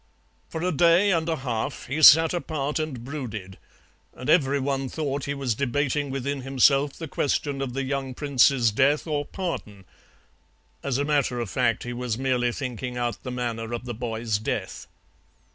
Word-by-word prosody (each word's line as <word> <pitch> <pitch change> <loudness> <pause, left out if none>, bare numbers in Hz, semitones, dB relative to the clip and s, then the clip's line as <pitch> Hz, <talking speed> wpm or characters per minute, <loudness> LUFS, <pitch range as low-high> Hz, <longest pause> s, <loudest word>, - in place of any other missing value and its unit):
For 160 - -4
a 180 - +1
day 170 +5 +4
and 165 -2 +1
a 165 - +1
half 125 -6 -3
he 150 +5 -3
sat 160 +2 +8
apart 155 -4 -2
and 145 -7 -4
brooded, 110 -9 -6 0.6
and 125 +4 -1
every 140 -4 +3
one 135 -1 -1
thought 145 -2 -3
he 140 - -2
was 135 -4 -1
debating 140 +3 -1
within 135 +1 -3
himself 135 +2 +3
the 165 - -7
question 140 0 -1
of 130 -3 -3
the 135 +1 -2
young 135 -1 -3
prince's 135 -4 +3
death 140 +7 +2
or 150 -3 -1
pardon; 110 - -5 1.0
as 135 -2 -1
a 140 - 0
matter 145 -4 +1
of 115 -5 -4
fact 115 -2 +1
he 120 - -5
was 120 -2 -3
merely 125 -2 +1
thinking 125 -1 -5
out 120 -1 -2
the 130 - -6
manner 120 -2 -3
of 120 +1 -4
the 120 - -4
boy's 115 -2 -2
death. 110 - -4
135 Hz, 175 wpm, -25 LUFS, 120-145 Hz, 1.0 s, sat